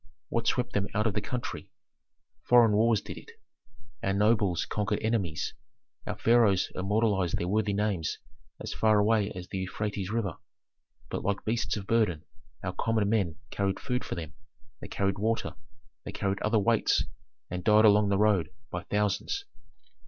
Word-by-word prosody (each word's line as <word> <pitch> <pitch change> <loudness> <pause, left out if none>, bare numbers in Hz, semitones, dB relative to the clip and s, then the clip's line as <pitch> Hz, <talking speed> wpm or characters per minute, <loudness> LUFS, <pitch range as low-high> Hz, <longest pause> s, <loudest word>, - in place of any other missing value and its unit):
What 115 -1 -1
swept 125 0 0
them 100 0 0
out 105 +1 +1
of 110 - +1
the - - -1
country? 125 -1 -5 0.7
Foreign 120 -3 +5
wars 110 +1 +3
did - - -8
it. - - -15 0.7
Our 95 - 0
nobles 100 -4 +2
conquered 105 0 -1
enemies, 100 -8 -1 0.5
our - - -3
pharaohs 115 -5 +3
immortalized 100 -2 +1
their 85 - -2
worthy 105 +1 +1
names 100 -6 -1 0.4
as 110 - -5
far 110 -1 +3
away 105 0 +2
as 90 -1 -7
the 95 - -3
Euphrates 100 +1 -3
River, 105 -6 -2 0.7
but - - -2
like 100 0 -1
beasts 115 0 0
of 100 - -6
burden 100 -8 +1 0.4
our 90 - -2
common 110 -1 0
men 100 -7 +1 0.2
carried 100 -1 -1
food 125 0 -2
for - - -4
them, 80 -5 -6 0.5
they - - -8
carried 100 0 -1
water, 110 +2 0 0.5
they - - -6
carried 100 -1 -2
other 110 +1 +2
weights, 115 +2 +3 0.5
and 90 0 -4
died 105 +2 +6
along 105 -1 +5
the 100 - +2
road 105 -5 +3 0.2
by - - -3
thousands. 105 -1 -1
105 Hz, 160 wpm, -29 LUFS, 95-110 Hz, 0.7 s, died